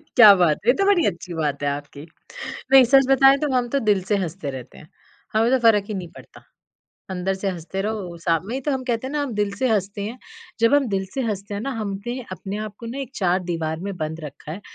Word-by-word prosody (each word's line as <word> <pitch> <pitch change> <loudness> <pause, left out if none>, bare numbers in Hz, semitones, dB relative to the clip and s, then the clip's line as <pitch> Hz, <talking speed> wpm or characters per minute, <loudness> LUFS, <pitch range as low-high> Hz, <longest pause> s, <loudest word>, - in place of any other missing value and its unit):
क्या 215 -4 +10
बात 175 -5 +3
है, - - +3
ये 245 - +7
तो 395 - 0
बड़ी 390 -5 +4
अच्छी 170 +1 -3
बात 145 -3 -2
है 145 - +1
आपकी। 145 +1 -6 0.7
नहीं, 265 -1 +9
सच 270 -1 +7
बताएँ 270 +1 +6
तो 295 - 0
हम 245 -1 +1
तो - - +4
दिल 190 -3 +2
से 205 - +4
हँसते 170 -3 -4
रहते 130 -2 -9
हैं, 155 - -15 0.4
हमें 225 +2 +3
तो 260 - +4
फ़र्क 210 -2 +4
ही 215 - -3
नहीं 180 -3 -5
पड़ता। - - -14 0.7
अंदर 190 +1 -1
से 195 +1 -3
हँसते 180 +2 -5
रहो, 200 -5 -4
शाम 165 +1 +1
में 240 - -3
ही 265 - -2
तो 295 - +2
हम 265 -1 -2
कहते 230 +2 -1
हैं 275 - -6
ना 295 - 0
हम 280 -4 -3
दिल 205 -1 0
से 260 - +1
हँसते 200 -1 -1
हैं, 230 +5 -5 0.4
जब 230 +5 +4
हम 285 -3 +3
दिल 195 -2 -1
से 270 - -1
हँसते 205 -3 -3
हैं 200 - -3
ना, 275 +5 -3
हमने 210 +5 -4
अपने 190 +3 -5
आप 210 - -10
को 230 - -8
ना 250 +4 -5
एक 270 -2 -5
चार 185 -1 +1
दीवार 160 -1 -2
में 195 -2 -4
बंद 160 0 -4
रखा 150 +1 -8
है। 195 - -7
200 Hz, 255 wpm, -22 LUFS, 175-245 Hz, 0.7 s, क्या